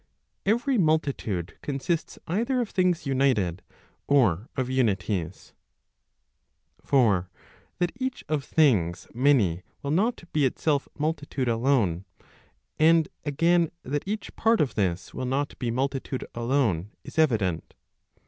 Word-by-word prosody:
Every 240 +4 +2
multitude 140 - 0
consists 145 +4 -2
either 235 +9 0
of 235 -4 -2
things 180 -4 +1
united, 130 -10 +1 0.5
or 115 - +3
of 130 -2 0
unities. 105 -8 -1 1.3
For 100 -10 +3 0.5
that 175 -1 0
each 260 -1 -3
of 150 -2 -1
things 100 - +2
many 115 -10 +3 0.2
will 140 - -2
not 205 +6 +1
be 150 - +2
itself 140 +2 +1
multitude 145 -3 -2
alone, 115 -7 +1 0.7
and 160 0 +5 0.2
again 165 +3 +2
that 145 +2 -2
each 215 +2 -4
part 225 0 +3
of 145 - +1
this 90 -4 -1
will 130 - -3
not 140 +3 -1
be 120 - -1
multitude 130 +1 -2
alone 115 - 0
is - - -5
evident. 105 - +1
135 Hz, 120 wpm, -26 LUFS, 110-160 Hz, 1.3 s, and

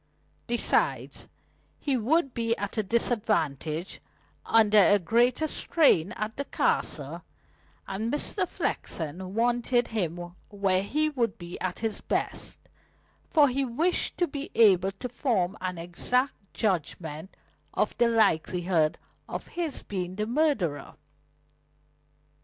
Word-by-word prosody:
Besides, 240 0 +1 0.5
he 280 -3 -1
would 270 +4 +1
be 230 0 0
at 205 0 -4
a 220 - +2
disadvantage, 190 - 0 0.5
under 215 -2 +5
a 205 +1 +6
greater 240 - +2
strain 245 - +3
at 215 0 -4
the 280 - -2
Castle, - - -1 0.7
and 215 +4 -3
Mr. 365 +5 -1
Flexen 185 +4 -3
wanted 240 +1 +1
him 175 -5 -3 0.2
where 195 -2 +1
he 305 +10 0
would 240 -7 -1
be 175 -1 -8
at 185 -1 -2
his 220 -2 -2
best, - - -2 0.7
for 295 -2 +5
he 270 +1 0
wished 305 +9 0
to 350 - +2
be 285 -1 -6
able 195 -4 +5
to 225 +6 -6
form 220 -7 0
an 180 -1 -3
exact 195 +6 -1
judgment 165 -4 -2 0.3
of - - 0
the 240 - +5
likelihood 175 -6 +2 0.3
of - - -6
his 335 -4 -4
being 185 -2 -4
the 210 +1 -1
murderer. 230 - 0
215 Hz, 120 wpm, -27 LUFS, 180-250 Hz, 0.7 s, a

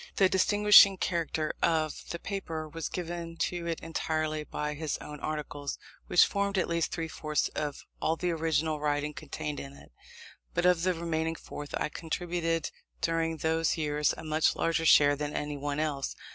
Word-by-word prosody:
The 195 - +5
distinguishing 200 +1 +7
character 165 -4 -1
of 155 -2 0
the 170 - -3
paper 170 -4 -4
was 165 +1 -5
given 170 -1 -5
to 175 0 -2
it 165 -1 -2
entirely 155 -1 -2
by 150 0 -3
his 150 0 -3
own 150 0 -9
articles, 145 -2 -4 0.3
which 175 - +6
formed 200 0 -1
at 185 - +2
least 170 -1 0
three 165 -1 -3
fourths 155 -1 -1
of 150 -2 -4 0.2
all 160 - +2
the 180 +1 -1
original 160 -1 0
writing 150 0 0
contained 150 +1 -5
in 140 0 -8
it: - - -16 0.6
but 175 - +1
of 180 -2 +4
the 185 0 +1
remaining 165 -1 -1
fourth 145 -2 -7
I - - -1
contributed 165 0 -2 0.3
during 165 -1 0
those 160 +2 +1
years 150 -1 +1
a - - -8
much 155 0 +2
larger 165 0 +1
share 145 -1 +7
than 145 0 -4
anyone 145 0 -3
else. 145 -3 -2
160 Hz, 170 wpm, -30 LUFS, 150-170 Hz, 0.6 s, distinguishing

